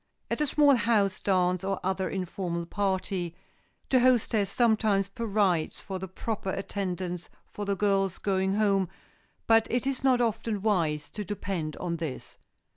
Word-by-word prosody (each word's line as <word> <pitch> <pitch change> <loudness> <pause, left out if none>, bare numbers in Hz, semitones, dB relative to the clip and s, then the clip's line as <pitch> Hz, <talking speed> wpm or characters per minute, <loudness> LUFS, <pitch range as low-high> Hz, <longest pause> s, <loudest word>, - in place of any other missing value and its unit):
At - - 0
a 300 - +2
small 290 0 +5
house 205 -3 +2
dance 180 -1 +1
or 195 0 -1
other 190 0 -1
informal 180 -2 -3
party 190 -2 -2 0.5
the 260 - +5
hostess 235 -5 +3
sometimes 215 -3 +2
provides 200 -7 0
for 190 -2 -5
the 190 - -5
proper 195 +2 -4
attendance 185 -3 -3 0.2
for 205 - -6
the 200 0 0
girls 195 -2 +1
going 190 -1 0
home 200 -4 +2 0.6
but 225 -1 +4
it 245 +1 0
is 270 -1 -2
not 260 -2 +4
often 225 -3 -1
wise 160 -8 +1
to 210 - -5
depend 185 -5 -3
on 170 -2 -3
this. 155 -5 -6
195 Hz, 150 wpm, -28 LUFS, 185-220 Hz, 0.6 s, small